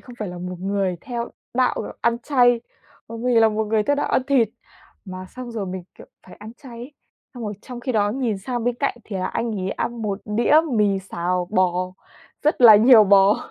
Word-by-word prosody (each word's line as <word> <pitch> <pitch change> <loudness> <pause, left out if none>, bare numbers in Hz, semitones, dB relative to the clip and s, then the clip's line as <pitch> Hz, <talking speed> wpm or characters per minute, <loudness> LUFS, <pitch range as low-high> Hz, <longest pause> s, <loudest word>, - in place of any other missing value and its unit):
không 245 - -13
phải 210 -3 -4
là 175 0 -8
một 180 0 -6
người 195 -2 -1
theo 240 -2 -5 0.3
đạo 255 0 +1 0.2
ăn 235 0 +1
chay, 245 -3 +3 0.5
bởi 230 0 -7
vì 250 -1 +2
là 225 - +5
một 215 0 -1
người 215 0 +1
theo 285 +5 0
đạo - - -1
ăn - - +2
thịt. 255 -6 +3 0.6
Mà 185 -1 -8
xong 255 +4 -9
rồi 215 -4 -4
mình, 185 0 -6
kiểu, - - -14 0.2
phải - - -13
ăn 215 +2 -11
chay 240 -3 -11
ấy, 250 +5 -9 0.4
xong 240 - -8
rồi 210 -1 -4
trong 245 -1 -9
khi 255 +1 -3
đó 205 -2 +1
nhìn 235 -5 -2
sang 240 +3 -4
bên 245 0 0
cạnh 280 - -1
thì 205 - -6
là 185 0 -2
anh 230 +3 -3
ấy 190 +1 -3
ăn 235 -1 -4
một 205 -1 -3
đĩa 230 +8 +2 0.2
mì 205 -4 +2
xào 180 -1 -3
bò 185 -4 +2 0.7
rất 300 -3 +1
là 220 -3 +10
nhiều 225 -1 +7
bò. 200 +1 +5
220 Hz, 220 wpm, -22 LUFS, 195-245 Hz, 0.7 s, là